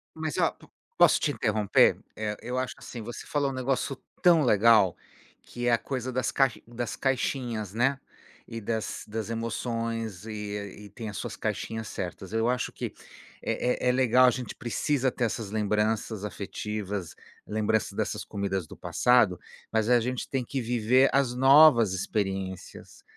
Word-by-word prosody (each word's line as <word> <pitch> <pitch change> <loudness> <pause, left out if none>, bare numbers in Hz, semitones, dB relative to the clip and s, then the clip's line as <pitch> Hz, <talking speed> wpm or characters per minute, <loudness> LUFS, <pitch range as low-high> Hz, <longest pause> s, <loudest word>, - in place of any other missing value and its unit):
Mas 155 -1 -3
ó, - - +3
po - - -20 0.3
posso - - +6
te 150 - +1
interromper? 105 -6 +3 0.2
Eh, 105 -1 -3
eu 125 +1 -4
acho 130 0 -2
assim, 120 - -8
você 115 +2 -7
falou 145 -2 0
um - - -5
negócio 130 +1 -1 0.3
tão 170 -3 +6
legal, 105 -5 +5 0.5
que 120 0 -5
é - - +4
a 120 - +5
coisa 130 0 -4
das 130 0 0
cai 135 -3 +3
das 120 0 -4
caixinhas, 120 -6 -1
né, 135 +4 +1 0.5
e 115 0 -6
das 110 +1 -3
das 110 0 -4
emoções, 115 -2 -3
e 105 -1 -6
e - - -12
tem 110 +2 -7
as 100 - -7
suas - - -5
caixinhas 110 0 -3
certas. 95 +1 -6
Eu 115 +1 +1
acho 125 +1 0
que - - -5 0.5
é 125 0 -1
é - - +5
é - - +6
legal, 130 0 +5
a - - +5
gente 125 0 -5
precisa 130 +2 0
ter - - -3
essas 110 -2 -3
lembranças 105 0 0
afetivas, 105 -2 -5 0.3
lembrança 110 0 0
dessas - - -2
comidas 95 -4 -3
do - - -12
passado, 120 -8 +3 0.3
mas 110 0 +1
a 125 -1 +6
gente 125 +2 -3
tem 130 -2 -1
que 135 +1 -3
viver 120 +3 +3
as 135 -3 +2
novas 135 -4 +7
experiências, 95 -1 -4
115 Hz, 165 wpm, -27 LUFS, 105-125 Hz, 0.5 s, novas